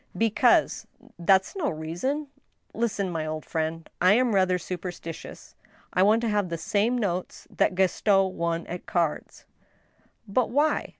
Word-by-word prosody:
" - - -12
Because 220 - +2
— - - -33
" - - -20
" - - -49
That's 190 - +4
no 350 -7 0
reason." 175 - -3 0.2
" - - -46
Listen, 205 -5 -1
my 160 -2 -2
old 155 0 -4
friend. 160 0 -3
I 185 +3 +6
am 245 0 +3
rather 185 -2 +3
superstitious, 175 -2 -7 0.4
I 185 - +2
want 215 +4 +4
to 235 - 0
have 205 -3 0
the 170 - -3
same 210 +9 +1
notes 185 -6 -3
that - - +1
Gaston 190 +1 +2
won 170 0 -1
at 175 +1 -7
cards." 170 -4 -2 0.8
"But 225 +4 +1
why?" 295 +4 +1
190 Hz, 170 wpm, -26 LUFS, 170-220 Hz, 0.8 s, I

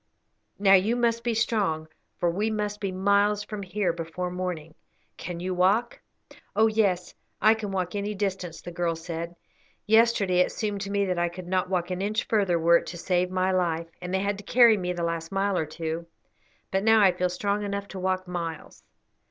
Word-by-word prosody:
Now 195 -1 +5
you 200 +5 +4
must 235 -1 +1
be 235 -2 0
strong, 205 -9 0 0.3
for 175 - +2
we 205 +6 0
must 210 -1 -2
be 195 -2 -1
miles 200 +2 +2
from 210 -1 -6
here 190 -1 -1
before 170 +2 -4
morning. 180 -4 -4 0.4
Can 175 -2 -6
you 185 +1 -2
walk?" 200 +7 +1 0.5
"Oh 220 +2 +5
yes, 205 -5 +1 0.3
I 215 - +6
can 215 -3 -5
walk 185 -2 -2
any 205 +1 -3
distance," 190 -4 -3
the 175 - -7
girl 170 -1 -1
said. 170 +1 -6 0.5
"Yesterday 220 -4 +4
it 180 - +3
seemed 205 -2 -3
to 200 - -4
me 200 0 +1
that 180 -2 -1
I 175 0 +1
could 175 +1 -9
not 185 0 0
walk 180 -1 -1
an 180 +1 -2
inch 215 +3 0
further 195 -6 +2
were 170 +1 +5
it - - -6
to 175 - -6
save 180 +1 0
my 185 0 +1
life, 170 -3 -1
and 180 0 -5
they 190 0 +1
had 200 0 -1
to - - -10
carry 235 +1 +6
me 180 -3 -2
the 175 -1 -3
last 165 0 -3
mile 195 0 0
or 160 -3 0
two, 165 +1 -4 0.6
but 190 - +1
now 220 0 +5
I 195 -3 +6
feel 180 0 -1
strong 200 +3 -1
enough 200 0 -3
to 190 - -7
walk 185 0 -1
miles." 170 -2 -5
185 Hz, 205 wpm, -26 LUFS, 175-205 Hz, 0.6 s, I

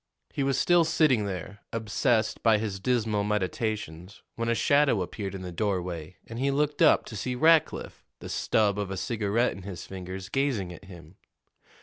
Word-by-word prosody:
He - - -2
was 135 0 +1
still 175 -1 +4
sitting 140 -9 +3
there, 100 +1 -6
obsessed 115 +1 0
by 115 -2 +4
his 105 -2 -3
dismal 110 -2 0
meditations, 100 -3 -3
when 115 0 -2
a 115 - +2
shadow 140 -7 +3
appeared 100 +1 -5
in 95 - -6
the 90 - -6
doorway, 90 -3 -3
and 115 +1 -7
he 135 +2 +1
looked 145 +2 0
up 160 - +5
to 110 - -8
see 125 +4 -3
Rackliff, 160 +3 +2
the - - -9
stub 105 -2 +1
of 100 -2 -2
a 95 - -4
cigarette 110 +3 0
in 95 - -9
his 90 -3 -7
fingers, 95 0 -7
gazing 115 -9 -1
at 95 - -13
him. 85 -2 -13
105 Hz, 180 wpm, -27 LUFS, 95-125 Hz, -, up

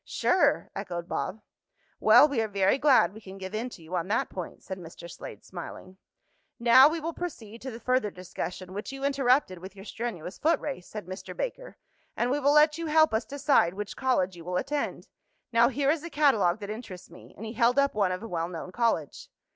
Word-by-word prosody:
"Sure!" 365 - +1
echoed 175 -1 -5
Bob. 210 +3 -3 0.6
"Well, 295 - +7
we 275 -6 0
are 220 - -1
very 200 +4 +2
glad 270 -7 +5
we 220 - -11
can 195 -1 -10
give 190 +1 -7
in 230 +4 -2
to 170 - -13
you 165 +3 -6
on 175 0 -1
that 215 +3 0
point," 180 -3 -7
said 190 -1 -6
Mr. 170 0 -10
Slade, 170 - -10
smiling. 185 +1 -9 0.6
"Now 255 +4 +7
we 330 +1 -2
will 330 +2 -4
proceed 235 -12 -7
to 265 - -5
the 230 -2 -8
further 250 -2 +1
discussion, 185 0 -7
which 205 +6 -5
you 270 0 -7
interrupted 270 -8 +2
with 190 +2 -10
your 195 0 -11
strenuous 200 -6 -5
foot 320 0 +3
race," 270 -11 -6
said 210 -4 -7
Mr. 185 +2 -8
Baker, - - -5 0.4
"and 245 +1 +1
we 285 - +1
will 285 0 +3
let 300 +1 +5
you 335 - -3
help 315 -3 +4
us 220 - 0
decide 275 - +2
which 210 0 -5
college 195 -9 +1
you 170 - -11
will 180 +1 -2
attend. 290 +8 -3 0.5
Now 230 +1 +5
here 275 +1 +1
is 315 -1 -2
a 340 - -6
catalogue 220 - +3
that 205 0 -5
interests 205 -6 -9
me," 175 - -15
and 220 - -7
he 220 - -6
held 235 +2 +3
up 280 0 +3
one 200 -3 +1
of 185 +3 -4
a - - -5
well 170 -5 -2
known 180 +1 -7
college. 205 - -1
225 Hz, 220 wpm, -28 LUFS, 185-275 Hz, 0.6 s, Well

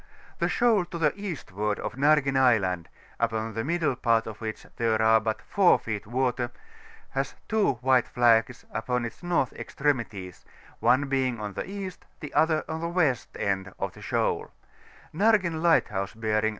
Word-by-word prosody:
The - - +1
shoal 225 -7 +3
to 170 - -7
the 155 -3 +2
eastward 105 - -3
of 105 - -4
Nargen 140 +1 +3
Island, 100 -10 +2 0.3
upon 110 +1 -1
the 115 +1 -2
middle 160 -3 0
part 115 -2 +2
of 110 0 -8
which 110 -1 -5
there 115 -2 +1
are 110 0 +5
but 110 0 -3
4 195 -3 +4
feet 105 -3 -5
water, 125 0 0 0.6
has - - -2
two 215 -9 +2
white 130 -1 +3
flags 120 0 +2
upon 125 +1 -1
its 115 - -8
north 175 -8 0
extremities, 115 - -3 0.4
one 130 +4 +3
being 130 -3 0
on 105 -1 -5
the - - -5
east, 195 -2 -6
the 150 - -8
other 155 +1 +2
on 160 0 -4
the 170 - -2
west, 160 -8 0
end 95 -1 -2
of - - -3
the - - -14
shoal; - - -1 0.6
Naigen 185 -4 +2
Lighthouse 105 - +2
bearing 110 -1 0
N. - - +3
125 Hz, 165 wpm, -27 LUFS, 110-160 Hz, 0.6 s, are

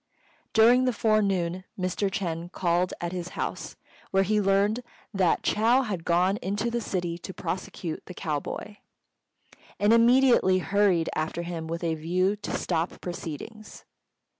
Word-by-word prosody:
During 240 +3 +6
the 255 - +1
forenoon 195 -6 +1
Mr. 185 +2 -1
Ch'êng 175 -3 -3
called 180 0 +1
at 170 0 -3
his 180 -1 -4
house, - - -4 0.3
where 195 0 +3
he 210 +2 +1
learnt 200 +3 +2 0.3
that 185 -4 +2
Chou 235 +5 +3
had 195 -8 -4
gone 180 +4 +2
into 205 +5 -2
the 235 0 -1
city 175 -5 -3
to 190 - -8
prosecute 175 -1 -5
the 180 - -9
cow 150 -3 -2
boy, 205 +7 -7 1.0
and 205 +2 +4
immediately 235 -4 +5
hurried 190 -3 +2
after 160 +2 -2
him 170 -2 -5
with 165 +1 -4
a 165 -1 +1
view 180 +5 0
to 205 - -4
stop 165 +2 -2
proceedings. 180 +5 -8
185 Hz, 145 wpm, -27 LUFS, 170-210 Hz, 1.0 s, During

